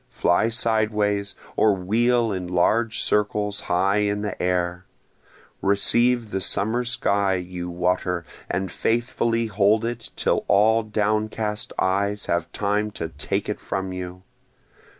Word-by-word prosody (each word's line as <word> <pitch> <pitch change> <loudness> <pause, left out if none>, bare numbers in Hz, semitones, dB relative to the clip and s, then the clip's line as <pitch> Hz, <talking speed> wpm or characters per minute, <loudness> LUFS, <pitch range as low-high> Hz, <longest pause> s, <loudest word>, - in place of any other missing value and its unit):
fly 90 +6 +2
sideways, 105 -3 0 0.2
or 105 -2 +4
wheel 115 +5 +1
in 90 -2 -3
large 105 +6 +2
circles 105 -1 0
high 95 +3 +1
in 105 0 0
the 105 - -4
air; 90 0 -1 0.8
Receive 115 +3 +2
the 95 - -2
summer 110 +5 +1
sky, 100 -5 +1
you 90 -1 -5
water, 90 0 -1 0.2
and 95 0 -2
faithfully 115 0 0
hold 105 +1 +2
it 120 0 -4
till - - +1
all 110 +3 +4
downcast 105 0 -1
eyes 100 +2 0
have 85 -1 -1
time 105 +1 0
to 85 -5 -5
take 75 -3 -3
it - - -3
from 95 -1 -4
you! 90 0 -7
105 Hz, 130 wpm, -23 LUFS, 90-110 Hz, 0.8 s, or